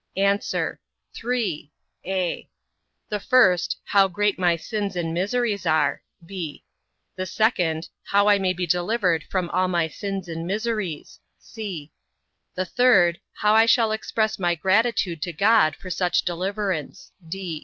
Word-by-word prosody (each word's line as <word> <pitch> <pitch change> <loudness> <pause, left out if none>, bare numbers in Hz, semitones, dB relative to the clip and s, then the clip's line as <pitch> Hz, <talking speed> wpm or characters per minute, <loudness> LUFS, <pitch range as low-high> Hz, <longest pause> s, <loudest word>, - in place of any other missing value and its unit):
A. 200 +1 +3 0.7
Three; 220 - -2 0.3
(a) 185 -2 -2 0.6
the 210 - -2
first, 195 -8 +3
how 195 -1 +4
great 205 +1 0
my 175 -2 +3
sins 200 +3 -4
and 165 -2 -2
miseries 200 +1 -1
are; 155 -3 +2 0.2
(b) 170 -5 -6 0.5
the 185 0 -4
second, 175 -6 0 0.2
how 200 +1 +3
I 205 -1 +5
may 190 -1 +1
be 180 0 -2
delivered 180 -1 +1
from 185 -2 -1
all 185 0 +2
my 170 -3 +1
sins 195 +2 -5
and 165 0 -5
miseries; 210 -5 -3 0.2
(c) 185 -10 -7 0.6
the 185 - -1
third, 185 -7 +4
how 210 0 +1
I 225 +1 +5
shall 225 -2 +4
express 220 0 -1
my 175 -2 +1
gratitude 190 -2 +1
to 175 +2 -3
God 195 -3 +4
for 185 - -9
such 175 0 +1
deliverance. 185 -2 -3
185 Hz, 135 wpm, -24 LUFS, 175-210 Hz, 0.7 s, I